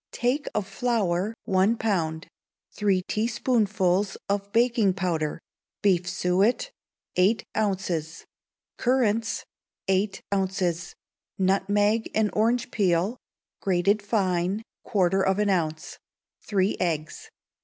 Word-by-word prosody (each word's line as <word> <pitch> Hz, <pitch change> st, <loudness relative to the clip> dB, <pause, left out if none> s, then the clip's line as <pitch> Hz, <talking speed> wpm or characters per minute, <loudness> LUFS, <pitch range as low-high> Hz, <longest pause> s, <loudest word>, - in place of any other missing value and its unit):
Take 255 Hz, +5 st, 0 dB
of 210 Hz, -2 st, 0 dB
flour, 200 Hz, -2 st, 0 dB
one 195 Hz, +4 st, +2 dB
pound; 170 Hz, -6 st, -1 dB, 0.5 s
three 195 Hz, -3 st, +1 dB
teaspoonfuls 210 Hz, -4 st, +1 dB
of 200 Hz, 0 st, -2 dB
baking 230 Hz, -4 st, +3 dB
powder; 170 Hz, -5 st, -1 dB, 0.4 s
beef 180 Hz, -3 st, +3 dB
suet, 190 Hz, -, +1 dB, 0.5 s
eight 195 Hz, +5 st, +3 dB
ounces; 180 Hz, -6 st, -2 dB, 0.5 s
currants, 230 Hz, -3 st, +1 dB, 0.4 s
eight 195 Hz, +2 st, 0 dB
ounces; 185 Hz, -3 st, -1 dB, 0.4 s
nutmeg 205 Hz, +3 st, +2 dB
and 215 Hz, -1 st, +2 dB
orange 235 Hz, +3 st, +1 dB
peel, 195 Hz, +3 st, +1 dB, 0.4 s
grated 195 Hz, +2 st, +2 dB
fine, 195 Hz, -1 st, 0 dB, 0.2 s
quarter 190 Hz, -3 st, +2 dB
of 190 Hz, 0 st, +2 dB
an 210 Hz, -1 st, +2 dB
ounce; 160 Hz, -4 st, -2 dB, 0.4 s
three 195 Hz, -2 st, +1 dB
eggs. 155 Hz, -3 st, -2 dB
195 Hz, 100 wpm, -26 LUFS, 180-220 Hz, 0.5 s, baking